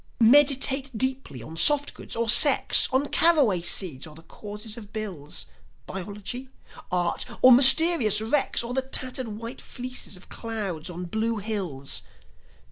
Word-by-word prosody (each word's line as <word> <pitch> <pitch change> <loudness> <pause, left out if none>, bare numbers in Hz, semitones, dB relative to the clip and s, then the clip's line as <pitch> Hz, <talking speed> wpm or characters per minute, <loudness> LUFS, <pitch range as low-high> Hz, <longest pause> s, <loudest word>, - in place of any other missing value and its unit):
Meditate 270 +2 +3
deeply 260 - -4
on 160 - -11
softgoods 290 - -1
or 230 0 -2
sex, 275 +5 +5
On 270 +3 -1
carraway 280 - +2
seeds 170 -5 -1
or 150 - -15
the 165 - -16
causes 210 +5 -8
of 215 -3 -13
bills, 190 -10 -6 0.4
Biology, 205 +7 -8 0.4
art, 175 -1 -2 0.2
or 255 - +7
mysterious 265 - +7
wrecks, 235 +3 0
Or 235 +1 -7
the 265 - -1
tattered 255 -1 -6
white 230 +4 -9
fleeces 250 -5 -7
of 180 - -18
clouds 200 -8 -6
on 180 +1 -8
blue 220 +5 -3
hills. 190 -10 -4
225 Hz, 135 wpm, -24 LUFS, 185-260 Hz, 0.4 s, or